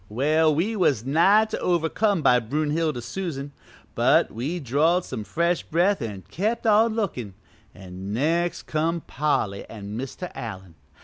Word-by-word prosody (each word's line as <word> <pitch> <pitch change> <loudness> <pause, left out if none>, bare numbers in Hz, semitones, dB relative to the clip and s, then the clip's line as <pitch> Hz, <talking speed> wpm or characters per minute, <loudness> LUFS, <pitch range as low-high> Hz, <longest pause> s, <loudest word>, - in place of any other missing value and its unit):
"Well, 155 +7 +2
we 200 +9 0
was 140 - +1
nigh 190 +10 +4
to 220 - -5
overcome 175 +2 +1
by 125 - +5
Brunhilde 150 +2 -1
Susan, 140 +1 -5 0.4
but - - +3
we 140 +11 -3
drawed 160 +6 +2
some 110 - -5
fresh 170 +8 0
breath 180 +5 +1
an' 105 -5 -5
kept 220 +6 -2
on 220 +1 +4
lookin', 125 - -3 0.4
an' 95 0 -8
next 165 +9 0
come 165 +2 -1
Polly 125 -12 -1
an' 105 -1 -8
Mr. 135 +9 -6
Allen. 95 -9 -7
155 Hz, 140 wpm, -24 LUFS, 115-175 Hz, 0.4 s, by